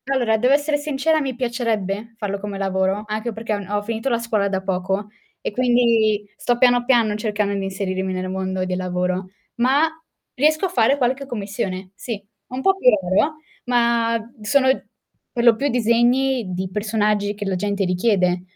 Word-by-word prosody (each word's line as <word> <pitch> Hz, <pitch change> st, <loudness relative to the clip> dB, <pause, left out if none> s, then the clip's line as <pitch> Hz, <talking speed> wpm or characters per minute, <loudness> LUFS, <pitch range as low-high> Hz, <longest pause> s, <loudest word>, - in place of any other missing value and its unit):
Allora, 250 Hz, -5 st, +2 dB
devo 250 Hz, +5 st, +3 dB
essere 290 Hz, +1 st, +2 dB
sincera, 300 Hz, +2 st, 0 dB
mi 265 Hz, -3 st, -3 dB
piacerebbe 230 Hz, -3 st, -2 dB
farlo 200 Hz, -2 st, -3 dB
come 200 Hz, 0 st, -5 dB
lavoro, 190 Hz, +1 st, 0 dB
anche 215 Hz, +2 st, -3 dB
perché 220 Hz, 0 st, -3 dB
ho 205 Hz, -, -1 dB
n 195 Hz, -, -8 dB
ho 205 Hz, 0 st, -1 dB
finito 225 Hz, +4 st, -2 dB
la 235 Hz, -, +2 dB
scuola 220 Hz, -4 st, 0 dB
da 190 Hz, -1 st, -2 dB
poco 190 Hz, +2 st, -2 dB, 0.3 s
e -, -, -4 dB
quindi 230 Hz, -3 st, +2 dB
sto 240 Hz, +2 st, 0 dB
piano, 245 Hz, -1 st, +4 dB
piano 235 Hz, -4 st, +3 dB
cercando 210 Hz, -1 st, -1 dB
di 195 Hz, -1 st, -2 dB
inserirmi 190 Hz, -1 st, -2 dB
nel 185 Hz, 0 st, -3 dB
mondo 190 Hz, 0 st, -2 dB
del 185 Hz, 0 st, -2 dB
lavoro, 180 Hz, 0 st, -2 dB, 0.3 s
ma 270 Hz, +6 st, +3 dB, 0.5 s
riesco 310 Hz, +6 st, +2 dB
a -, -, -1 dB
fare 270 Hz, -3 st, +3 dB
qualche 265 Hz, +1 st, 0 dB
commissione. 195 Hz, -5 st, -4 dB
Sì, 210 Hz, +2 st, -6 dB, 0.3 s
un 255 Hz, +1 st, -5 dB
po' 385 Hz, +6 st, +3 dB
più 255 Hz, -, +5 dB
lavoro, 195 Hz, -, +2 dB, 0.3 s
ma 235 Hz, -1 st, +2 dB, 0.2 s
sono 260 Hz, +5 st, +3 dB, 0.6 s
per 235 Hz, -, -1 dB
lo 235 Hz, -2 st, +7 dB
più 280 Hz, +5 st, -1 dB
disegni 240 Hz, -1 st, +2 dB
di 185 Hz, +1 st, -2 dB
personaggi 210 Hz, 0 st, 0 dB
che 205 Hz, -, -5 dB
la 195 Hz, -1 st, -1 dB
gente 200 Hz, +1 st, -1 dB
richiede, 180 Hz, -1 st, +1 dB
215 Hz, 175 wpm, -21 LUFS, 195-245 Hz, 0.6 s, lo